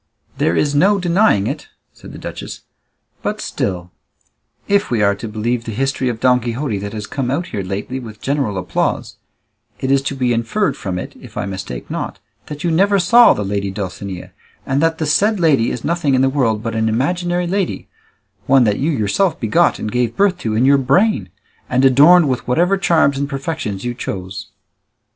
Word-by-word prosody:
"There 85 Hz, -, +2 dB
is 145 Hz, -1 st, +1 dB
no 190 Hz, +8 st, +4 dB
denying 175 Hz, -, +2 dB
it," -, -, -4 dB, 0.3 s
said -, -, -13 dB
the -, -, -10 dB
duchess; -, -, -7 dB, 0.6 s
"but -, -, -3 dB
still, 90 Hz, -2 st, -3 dB, 0.8 s
if 200 Hz, 0 st, +2 dB
we 115 Hz, -4 st, +1 dB
are 100 Hz, 0 st, +4 dB
to 100 Hz, +3 st, -7 dB
believe 115 Hz, +3 st, -2 dB
the 115 Hz, -, -4 dB
history 135 Hz, +2 st, -1 dB
of 115 Hz, -2 st, -4 dB
Don 125 Hz, 0 st, +4 dB
Quixote 120 Hz, -2 st, -3 dB
that 100 Hz, +1 st, -6 dB
has 105 Hz, -2 st, -5 dB
come 130 Hz, +1 st, -3 dB
out 150 Hz, +7 st, -1 dB
here 100 Hz, -, -3 dB
lately 100 Hz, +7 st, -4 dB
with 110 Hz, -4 st, -10 dB
general 135 Hz, -8 st, -1 dB
applause, 90 Hz, -, -2 dB, 0.6 s
it 130 Hz, -, -1 dB
is 135 Hz, -1 st, +4 dB
to 140 Hz, 0 st, -3 dB
be 125 Hz, -2 st, +1 dB
inferred 120 Hz, -, 0 dB
from 95 Hz, -3 st, -4 dB
it, 90 Hz, -, -6 dB
if -, -, -12 dB
I -, -, -1 dB
mistake 95 Hz, -11 st, -6 dB
not, -, -, -4 dB, 0.3 s
that 150 Hz, -1 st, -7 dB
you 170 Hz, -, +1 dB
never 200 Hz, +5 st, +3 dB
saw 230 Hz, +7 st, +6 dB
the 105 Hz, -, -3 dB
lady 100 Hz, 0 st, -2 dB
Dulcinea, 95 Hz, -1 st, -6 dB, 0.3 s
and 135 Hz, +1 st, 0 dB
that 165 Hz, 0 st, +1 dB
the 160 Hz, -, -2 dB
said 205 Hz, +8 st, +2 dB
lady 145 Hz, -9 st, +3 dB
is 120 Hz, -, -5 dB
nothing 165 Hz, -5 st, +1 dB
in 130 Hz, -, +3 dB
the 135 Hz, -, +3 dB
world 115 Hz, -6 st, 0 dB
but 115 Hz, -1 st, -3 dB
an 110 Hz, 0 st, 0 dB
imaginary 175 Hz, +9 st, 0 dB
lady, 190 Hz, +1 st, -2 dB, 0.6 s
one 135 Hz, -1 st, +5 dB
that 105 Hz, -3 st, +1 dB
you 145 Hz, -, 0 dB
yourself 145 Hz, -, 0 dB
begot 145 Hz, +10 st, +2 dB
and 105 Hz, -, -4 dB
gave 120 Hz, -1 st, -1 dB
birth 195 Hz, -3 st, +2 dB
to 110 Hz, -1 st, -2 dB
in 120 Hz, +4 st, +2 dB
your 140 Hz, +1 st, +5 dB
brain, 180 Hz, -, +2 dB, 0.4 s
and 130 Hz, +2 st, +2 dB
adorned 150 Hz, +6 st, +6 dB
with 130 Hz, -2 st, -2 dB
whatever 175 Hz, +10 st, +2 dB
charms 160 Hz, -7 st, +2 dB
and 140 Hz, 0 st, -2 dB
perfections 135 Hz, -, -4 dB
you 120 Hz, -, -2 dB
chose." 100 Hz, -3 st, -6 dB
130 Hz, 195 wpm, -18 LUFS, 110-165 Hz, 0.8 s, saw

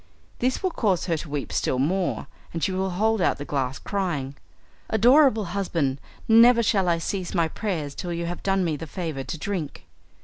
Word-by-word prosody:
This 255 Hz, +8 st, 0 dB
will 375 Hz, -, +1 dB
cause 195 Hz, -, 0 dB
her 170 Hz, -, 0 dB
to 155 Hz, -, -7 dB
weep 145 Hz, -1 st, -4 dB
still 130 Hz, -, 0 dB
more, 175 Hz, +8 st, 0 dB, 0.3 s
and 165 Hz, -2 st, -4 dB
she 190 Hz, -, +1 dB
will 190 Hz, +1 st, -1 dB
hold 215 Hz, +3 st, +1 dB
out -, -, +2 dB
the 145 Hz, -, -6 dB
glass 135 Hz, -2 st, -2 dB
crying, 165 Hz, -9 st, -3 dB, 0.5 s
"Adorable 240 Hz, 0 st, +5 dB
husband, 160 Hz, -9 st, -1 dB, 0.3 s
never 235 Hz, +1 st, +7 dB
shall 195 Hz, -4 st, +2 dB
I 170 Hz, -, +3 dB
cease 185 Hz, +2 st, -3 dB
my 165 Hz, -2 st, +3 dB
prayers 160 Hz, -6 st, -3 dB
till 175 Hz, +4 st, -5 dB
you 170 Hz, 0 st, -2 dB
have 175 Hz, +1 st, -5 dB
done 195 Hz, -1 st, +1 dB
me 160 Hz, -2 st, 0 dB
the 165 Hz, -, -7 dB
favour 160 Hz, -5 st, -4 dB
to 135 Hz, -, -5 dB
drink." 175 Hz, -3 st, -4 dB
180 Hz, 195 wpm, -25 LUFS, 155-205 Hz, 0.5 s, never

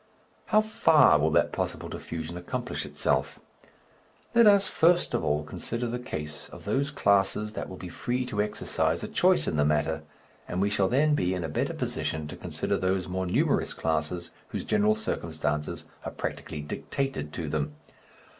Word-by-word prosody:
How 215 Hz, -1 st, +5 dB
far 155 Hz, -, +5 dB
will 80 Hz, +2 st, +3 dB
that -, -, +3 dB
possible -, -, -3 dB
diffusion 80 Hz, +1 st, -6 dB
accomplish 90 Hz, 0 st, -4 dB
itself? 65 Hz, 0 st, 0 dB, 0.9 s
Let 235 Hz, -2 st, +7 dB
us 200 Hz, -1 st, +6 dB
first 175 Hz, +2 st, +3 dB
of -, -, 0 dB
all 75 Hz, 0 st, +1 dB
consider 115 Hz, +10 st, -4 dB
the 120 Hz, +1 st, -2 dB
case 75 Hz, -, -6 dB
of -, -, -12 dB
those 140 Hz, +1 st, +1 dB
classes 100 Hz, -3 st, +2 dB
that -, -, -5 dB
will 95 Hz, -, -8 dB
be 90 Hz, -, -7 dB
free 125 Hz, +8 st, -2 dB
to 105 Hz, -4 st, -1 dB
exercise 105 Hz, 0 st, 0 dB
a -, -, -3 dB
choice -, -, +3 dB
in 75 Hz, -, 0 dB
the 75 Hz, -, +4 dB
matter, 75 Hz, +2 st, +1 dB, 0.5 s
and 90 Hz, -, -3 dB
we 100 Hz, +1 st, +2 dB
shall 100 Hz, -2 st, +2 dB
then 150 Hz, +5 st, +3 dB
be 95 Hz, -10 st, +1 dB
in 90 Hz, -, -3 dB
a 80 Hz, -, -3 dB
better -, -, -1 dB
position 80 Hz, -1 st, -2 dB
to -, -, -6 dB
consider -, -, -2 dB
those 95 Hz, 0 st, 0 dB
more 95 Hz, 0 st, -2 dB
numerous 90 Hz, -, +1 dB
classes 80 Hz, +2 st, -1 dB, 0.2 s
whose -, -, -5 dB
general 215 Hz, +1 st, +3 dB
circumstances 80 Hz, -, -2 dB, 0.2 s
are -, -, -3 dB
practically 75 Hz, -, -5 dB
dictated 75 Hz, -, -3 dB
to 85 Hz, -3 st, -4 dB
them. 75 Hz, -1 st, -2 dB
95 Hz, 175 wpm, -28 LUFS, 80-125 Hz, 0.9 s, Let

